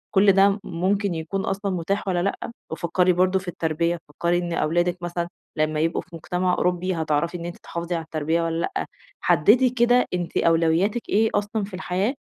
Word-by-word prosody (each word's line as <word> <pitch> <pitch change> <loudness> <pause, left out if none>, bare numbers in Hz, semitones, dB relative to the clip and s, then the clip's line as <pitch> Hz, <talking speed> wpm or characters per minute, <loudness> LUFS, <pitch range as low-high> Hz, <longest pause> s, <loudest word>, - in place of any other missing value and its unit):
كل 195 +1 +6
ده 195 +1 +5
م 200 +1 -1
ممكن 195 +2 0
يكون 165 +5 -3
أصلًا 195 0 -2
متاح 195 +4 -2
والّا 180 -2 +1
لأ 200 +3 -3 0.2
وفكّري 180 +2 +2
برضه 185 +2 +2
في 185 - -13
التربية، 170 0 -1
فكّري 170 +3 0
إن 175 -1 -2
أولادِك 175 +2 +1
مثلًا 175 0 -3 0.3
لمّا 155 0 +1
يبقوا 165 +2 0
في - - -23
مُجتمع 180 +2 -1
أوروبي 180 +1 0
هتعرفي 160 +2 0
إن 170 - -7
أنتِ 175 - -6
تحافظي 170 +1 -4
على 165 - -3
التربية 160 +1 -1
والّا 165 0 -1
لأ؟ - - -2 0.4
حدّدي 245 - +4
كده 245 0 +3
أنتِ 175 -1 -2
أولوياتِك 170 +7 +2
إيه 220 +2 +3
أصلًا 205 +1 -1
في 195 -1 -8
الحياة 190 +5 -1
180 Hz, 185 wpm, -24 LUFS, 165-195 Hz, 0.4 s, كل